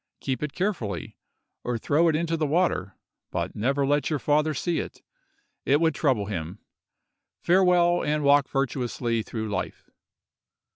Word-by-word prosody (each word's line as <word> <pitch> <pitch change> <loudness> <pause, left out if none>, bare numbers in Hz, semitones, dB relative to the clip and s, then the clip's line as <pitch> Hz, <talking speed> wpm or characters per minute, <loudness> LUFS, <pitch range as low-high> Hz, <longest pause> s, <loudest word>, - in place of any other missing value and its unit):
Keep 130 -2 -3
it 150 -1 -3
carefully, 120 - -3 0.5
or 120 -1 -1
throw 150 +8 +2
it 160 - +2
into 165 +1 0
the 155 -2 0
water, 145 - 0 0.3
but - - -3
never 135 +6 +1
let 145 +1 +1
your 155 - 0
father 150 +3 +2
see 165 +4 -1
it—it 145 +2 -4
would 160 -1 +2
trouble 130 -11 +1
him. 90 -2 -5 0.8
Farewell, 175 -1 +3
and 150 0 0
walk 140 0 +4
virtuously 120 -3 -1
through 110 0 -5
life. 100 -3 -5
145 Hz, 140 wpm, -26 LUFS, 120-160 Hz, 0.8 s, walk